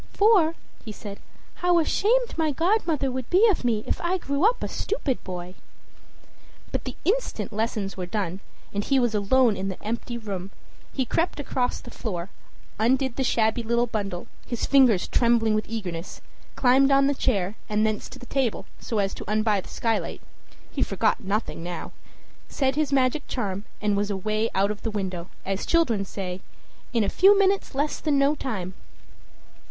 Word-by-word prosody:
"For," 390 Hz, -7 st, +4 dB, 0.3 s
he 220 Hz, -, -6 dB
said, 205 Hz, -1 st, -8 dB, 0.4 s
"how 355 Hz, -1 st, +4 dB
ashamed 460 Hz, +9 st, +2 dB
my 320 Hz, -1 st, +1 dB
godmother 325 Hz, -3 st, +1 dB
would 255 Hz, -1 st, -4 dB
be 390 Hz, +6 st, +6 dB
of 380 Hz, -, +1 dB
me 225 Hz, -3 st, +1 dB
if -, -, -2 dB
I 350 Hz, +2 st, +1 dB
grew 280 Hz, -3 st, -2 dB
up 475 Hz, +4 st, +3 dB
a -, -, -1 dB
stupid 305 Hz, -, -2 dB
boy!" 180 Hz, -1 st, -6 dB, 1.2 s
But -, -, -3 dB
the -, -, -5 dB
instant 460 Hz, -, 0 dB
lessons 215 Hz, -2 st, -2 dB
were 180 Hz, -2 st, -4 dB
done, 190 Hz, -2 st, -2 dB, 0.3 s
and 205 Hz, 0 st, -1 dB
he 275 Hz, -, +2 dB
was 240 Hz, -3 st, +2 dB
alone 220 Hz, +3 st, +3 dB
in 195 Hz, 0 st, -3 dB
the 190 Hz, -, -6 dB
empty 235 Hz, +2 st, -3 dB
room, 195 Hz, -4 st, -5 dB, 0.4 s
he 265 Hz, -, -1 dB
crept 330 Hz, +6 st, 0 dB
across 255 Hz, -3 st, -1 dB
the 240 Hz, -, -11 dB
floor, 190 Hz, -6 st, -4 dB, 0.5 s
undid 255 Hz, +2 st, +2 dB
the 270 Hz, -, 0 dB
shabby 225 Hz, -2 st, +2 dB
little 235 Hz, +1 st, +1 dB
bundle, 200 Hz, -6 st, -3 dB, 0.2 s
his 240 Hz, -, -2 dB
fingers 255 Hz, -9 st, +5 dB
trembling 235 Hz, -2 st, +3 dB
with 215 Hz, -1 st, -1 dB
eagerness, 185 Hz, -6 st, -5 dB, 0.4 s
climbed 265 Hz, +1 st, +5 dB
on 275 Hz, 0 st, +5 dB
the 285 Hz, -, +3 dB
chair, 200 Hz, -8 st, 0 dB, 0.2 s
and 215 Hz, +1 st, +2 dB
thence 215 Hz, -1 st, -2 dB
to -, -, -10 dB
the 255 Hz, -, -11 dB
table, 255 Hz, -5 st, -1 dB
so 225 Hz, -, -3 dB
as 195 Hz, -1 st, +1 dB
to -, -, -8 dB
unbar 215 Hz, -2 st, +2 dB
the -, -, -14 dB
skylight, 225 Hz, -1 st, -2 dB, 0.5 s
he -, -, -3 dB
forgot -, -, +1 dB
nothing 200 Hz, -2 st, -2 dB
now, 175 Hz, +1 st, -5 dB, 0.6 s
said 270 Hz, -2 st, 0 dB
his 300 Hz, -2 st, 0 dB
magic 270 Hz, +2 st, +2 dB
charm, 200 Hz, -4 st, -3 dB
and 210 Hz, -1 st, +1 dB
was 205 Hz, +1 st, 0 dB
away 215 Hz, +3 st, 0 dB
out 200 Hz, +2 st, +3 dB
of 210 Hz, -, -6 dB
the 225 Hz, -, -2 dB
window, 190 Hz, -4 st, -4 dB, 0.2 s
as 195 Hz, +1 st, -2 dB
children 255 Hz, -12 st, +2 dB
say, 185 Hz, -1 st, -5 dB, 0.5 s
"in 230 Hz, -3 st, +2 dB
a -, -, 0 dB
few 395 Hz, -, +6 dB
minutes 390 Hz, -6 st, +2 dB
less 290 Hz, +2 st, 0 dB
than 300 Hz, -3 st, +1 dB
no 275 Hz, +1 st, +4 dB
time." 205 Hz, -11 st, -4 dB
230 Hz, 180 wpm, -25 LUFS, 200-275 Hz, 1.2 s, be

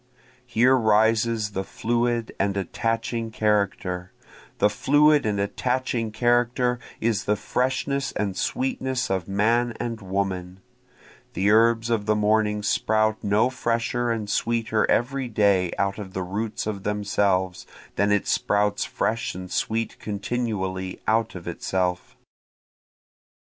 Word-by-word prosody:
Here 125 Hz, +2 st, +4 dB
rises 110 Hz, -1 st, +2 dB
the 95 Hz, -1 st, -2 dB
fluid 120 Hz, +2 st, -1 dB
and 100 Hz, 0 st, 0 dB
attaching 115 Hz, +4 st, -2 dB
character, 100 Hz, -4 st, -1 dB, 0.5 s
The -, -, +4 dB
fluid 145 Hz, +4 st, +3 dB
and 105 Hz, -1 st, 0 dB
attaching 120 Hz, +2 st, -1 dB
character 120 Hz, +2 st, +1 dB, 0.2 s
is 115 Hz, -2 st, 0 dB
the 105 Hz, -, +2 dB
freshness 130 Hz, +5 st, -1 dB
and 100 Hz, -2 st, -2 dB
sweetness 130 Hz, -, -1 dB
of 95 Hz, -3 st, -1 dB
man 115 Hz, +4 st, +1 dB
and 115 Hz, -2 st, -4 dB
woman, 95 Hz, -1 st, -3 dB, 0.7 s
(The 100 Hz, +3 st, +2 dB
herbs 115 Hz, +1 st, +4 dB
of 110 Hz, -2 st, 0 dB
the 110 Hz, -, +3 dB
morning 105 Hz, 0 st, +1 dB
sprout 110 Hz, +1 st, +1 dB
no 105 Hz, +5 st, +2 dB
fresher 120 Hz, 0 st, -1 dB
and 110 Hz, -3 st, -2 dB
sweeter 115 Hz, 0 st, 0 dB
every 130 Hz, +2 st, +1 dB
day 100 Hz, -5 st, +2 dB
out 100 Hz, +1 st, -1 dB
of 95 Hz, -2 st, -8 dB
the 95 Hz, -, -2 dB
roots 105 Hz, +4 st, -3 dB
of 105 Hz, -2 st, -3 dB
themselves, 100 Hz, -3 st, 0 dB, 0.3 s
than 100 Hz, +1 st, +2 dB
it 105 Hz, -1 st, +2 dB
sprouts 105 Hz, 0 st, +1 dB
fresh 115 Hz, -3 st, -2 dB
and 90 Hz, 0 st, -8 dB
sweet 115 Hz, +1 st, -2 dB
continually 100 Hz, -4 st, -3 dB
out 110 Hz, 0 st, +1 dB
of 90 Hz, -1 st, -8 dB
itself.) 90 Hz, +1 st, -2 dB
110 Hz, 125 wpm, -24 LUFS, 100-120 Hz, 0.7 s, Here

